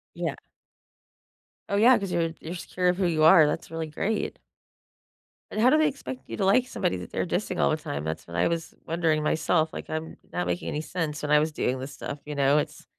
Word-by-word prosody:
Yeah. - - -2 1.3
Oh, 200 - -1
yeah, 235 +4 +6
‘cause 195 -3 -4
you're 165 -1 0
you're 170 +3 -6
secure 180 +1 -2
of 180 - +1
who 190 - +1
you 160 -2 +2
are, 160 -1 +8
that's 150 - -2
really 165 -1 -4
great. 205 +8 -2 1.1
And 215 - -3
how 245 +3 +6
do 305 - +5
they 310 -1 +4
expect 275 -2 -5
you - - -6
to 195 - +1
like 245 +6 +4
somebody 95 - -1
that 90 - -8
they're - - -1
dissing - - -2
all 70 - +3
the - - +1
time? 70 +1 -5
That's 80 +1 -4
what 85 0 -6
I 85 - +3
was 165 -1 -3
wondering 160 -2 +1
myself, 160 +1 +1
like, - - -7
I'm 155 0 -4 0.2
not 180 - -1
making 175 - -2
any 150 - -2
sense 155 -1 -3
when 150 - -1
I 150 - +7
was 155 +1 0
doing 130 -3 -1
this 135 +2 -6
stuff, 140 +1 -6
you 150 -1 -5
know, 140 +1 +4
it's 155 +3 -5
160 Hz, 230 wpm, -26 LUFS, 150-180 Hz, 1.3 s, are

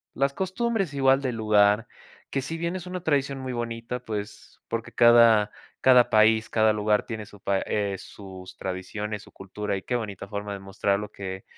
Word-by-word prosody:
Las 140 +1 +1
costumbres 195 - -1
igual, 135 0 +3
del 125 -3 -2
lugar, 105 +1 +3 0.4
que 135 - 0
si 165 +5 -5
bien 170 +2 -2
es 185 -1 -6
una 180 0 -5
tradición 140 -3 0
muy 130 -1 -4
bonita, 120 +1 -4
pues 105 -2 -6
Porque 115 0 -4
cada 115 -3 +6 0.3
cada 125 -2 +6
país, 110 +1 +4
cada 110 -1 +3
lugar 105 0 +1
tiene 110 -2 -5
su 105 -1 -16
pa 100 0 +1
eh, 100 -2 -1
sus 95 -2 -11
tradiciones, 100 +3 -5
su - - -17
cultura 100 +1 -5
y - - -6
qué 125 - -2
bonita 100 -4 -4
forma 100 0 -5
de 100 - -6
mostrarlo 100 +1 -1
que 95 -1 -7
110 Hz, 180 wpm, -26 LUFS, 100-130 Hz, 0.4 s, cada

